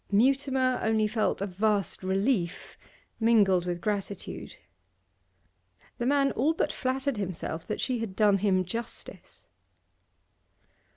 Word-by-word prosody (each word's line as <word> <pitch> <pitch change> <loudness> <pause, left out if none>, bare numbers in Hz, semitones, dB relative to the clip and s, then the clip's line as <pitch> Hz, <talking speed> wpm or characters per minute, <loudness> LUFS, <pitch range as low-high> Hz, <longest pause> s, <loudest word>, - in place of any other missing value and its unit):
Mutimer 260 +3 +2
only 220 -1 +2
felt 215 -2 0
a - - +1
vast 200 0 0
relief, 190 -1 -1 0.4
mingled 200 -6 +4
with 175 -1 -2
gratitude. 200 -1 -4 1.4
The 240 - 0
man 275 0 +3
all 290 +7 +1
but - - 0
flattered 265 -1 -1
himself 175 -4 -4
that 215 - -3
she 255 -3 -1
had 220 -4 -4
done 205 -2 +4
him 185 -2 +2
justice. 230 +6 -7
215 Hz, 115 wpm, -28 LUFS, 190-255 Hz, 1.4 s, mingled